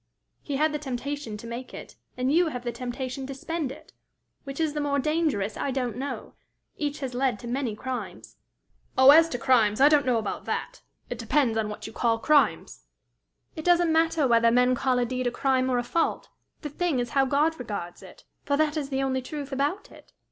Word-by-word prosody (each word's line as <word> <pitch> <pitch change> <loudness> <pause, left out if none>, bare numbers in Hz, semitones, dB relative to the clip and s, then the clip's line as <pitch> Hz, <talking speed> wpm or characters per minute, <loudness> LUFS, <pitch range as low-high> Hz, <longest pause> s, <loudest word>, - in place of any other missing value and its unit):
"He 285 - -4
had 305 +3 +2
the 300 - -2
temptation 270 -3 -4
to 220 - -11
make 235 +2 -7
it, - - -10 0.2
and 255 +2 +1
you 345 +1 +4
have 250 -6 -5
the 240 - -2
temptation 255 +2 -5
to 275 - -6
spend 310 0 -3
it: - - -13 0.5
which 275 +1 -7
is 315 -2 0
the 300 - -2
more 285 -1 0
dangerous, 290 -9 0
I - - -2
don't 250 -4 -2
know. 275 +3 -5 0.4
Each 295 -1 -3
has 260 -2 -4
led 250 -2 0
to 235 - -9
many 245 -3 -2
crimes." 260 +3 -6 0.6
"Oh, 260 +1 +9
as 325 +2 +7
to 245 - -3
crimes 240 -5 +3
I 280 +2 +7
don't 290 -3 +3
know 245 -2 +3
about 220 - -4
that! - - -4 0.3
It - - -4
depends 265 -7 +1
on 220 -1 -1
what 210 - -7
you 220 - -8
call 230 -1 +1
crimes." 290 +6 +1 0.7
"It 315 - -6
doesn't 345 -1 +3
matter 325 -3 +2
whether 230 -1 +4
men 250 +2 +4
call 255 0 +1
a 245 - +2
deed 255 +1 -2
a - - 0
crime 260 0 +1
or 250 - +1
a 245 - 0
fault; 330 +7 -1 0.3
the 295 - -5
thing 330 0 -1
is 240 -1 -2
how 275 -2 +3
God 295 +4 +1
regards 200 -7 -6
it, - - -14 0.2
for 285 - 0
that 310 0 +1
is 285 -3 -3
the 270 -1 -1
only 260 -1 0
truth 285 +1 -7
about 290 +9 -2
it. - - -17
265 Hz, 215 wpm, -26 LUFS, 245-295 Hz, 0.7 s, Oh